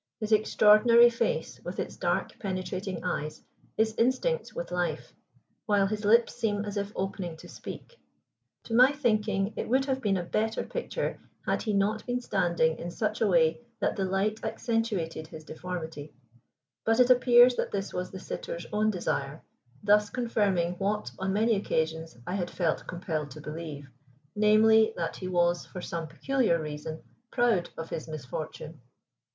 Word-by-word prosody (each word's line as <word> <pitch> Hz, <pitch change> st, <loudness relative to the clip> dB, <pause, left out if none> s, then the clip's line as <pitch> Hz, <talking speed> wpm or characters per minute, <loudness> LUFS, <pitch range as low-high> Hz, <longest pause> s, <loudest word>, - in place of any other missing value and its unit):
His 215 Hz, -1 st, -4 dB
extraordinary 215 Hz, +2 st, +6 dB
face, 485 Hz, -, -2 dB
with -, -, -6 dB
its -, -, -4 dB
dark -, -, -1 dB
penetrating 185 Hz, -1 st, -4 dB
eyes, 155 Hz, -4 st, -3 dB, 0.3 s
is 220 Hz, 0 st, +2 dB
instinct 260 Hz, -, +1 dB
with -, -, -5 dB
life, -, -, -2 dB, 0.5 s
while 205 Hz, -2 st, +3 dB
his 210 Hz, +2 st, -3 dB
lips 230 Hz, +3 st, +4 dB
seem 205 Hz, -2 st, -1 dB
as 205 Hz, 0 st, -5 dB
if 200 Hz, 0 st, -2 dB
opening 185 Hz, -3 st, -3 dB
to -, -, -12 dB
speak. 485 Hz, -, -10 dB, 0.6 s
To 230 Hz, -, -6 dB
my 255 Hz, +4 st, +6 dB
thinking 215 Hz, -6 st, 0 dB
it -, -, -4 dB
would 265 Hz, +2 st, +3 dB
have 265 Hz, -1 st, -1 dB
been 200 Hz, -4 st, +1 dB
a 180 Hz, -, -2 dB
better 220 Hz, +5 st, -1 dB
picture -, -, -3 dB, 0.3 s
had -, -, 0 dB
he 215 Hz, -, -1 dB
not 210 Hz, +2 st, +1 dB
been 245 Hz, 0 st, 0 dB
standing 175 Hz, -8 st, +1 dB
in 175 Hz, -, -5 dB
such 215 Hz, +4 st, -2 dB
a 220 Hz, -, +4 dB
way 165 Hz, 0 st, +3 dB, 0.2 s
that -, -, 0 dB
the 195 Hz, -, -1 dB
light 195 Hz, +3 st, -1 dB
accentuated 200 Hz, -9 st, -2 dB
his 160 Hz, -1 st, -10 dB
deformity; 160 Hz, -2 st, -7 dB, 0.7 s
but 225 Hz, +2 st, +2 dB
it 250 Hz, 0 st, +6 dB
appears 245 Hz, 0 st, +7 dB
that -, -, -1 dB
this 195 Hz, -1 st, -3 dB
was 180 Hz, 0 st, -3 dB
the 190 Hz, -, -8 dB
sitter's 170 Hz, -2 st, -6 dB
own 215 Hz, +1 st, +2 dB
desire, 165 Hz, -6 st, -2 dB, 0.4 s
thus 210 Hz, 0 st, +4 dB
confirming 195 Hz, -8 st, 0 dB
what, 210 Hz, +2 st, -1 dB
on 190 Hz, 0 st, -1 dB
many 220 Hz, +3 st, +3 dB
occasions, 160 Hz, -5 st, -2 dB
I 180 Hz, -, -4 dB
had 180 Hz, -3 st, -2 dB
felt 170 Hz, -4 st, -1 dB
compelled 165 Hz, -4 st, -3 dB
to 135 Hz, -, -10 dB
believe, 150 Hz, -2 st, -7 dB, 0.5 s
namely, 220 Hz, +1 st, +5 dB
that 165 Hz, -1 st, -3 dB
he 185 Hz, -, -5 dB
was, 175 Hz, -1 st, +1 dB
for 185 Hz, -, -8 dB
some 170 Hz, -2 st, -4 dB
peculiar 215 Hz, -, +1 dB
reason, 155 Hz, +1 st, -6 dB, 0.3 s
proud 235 Hz, -9 st, +2 dB
of 165 Hz, 0 st, -6 dB
his 160 Hz, -, -4 dB
misfortune. 155 Hz, +1 st, -7 dB
200 Hz, 165 wpm, -28 LUFS, 170-220 Hz, 0.7 s, appears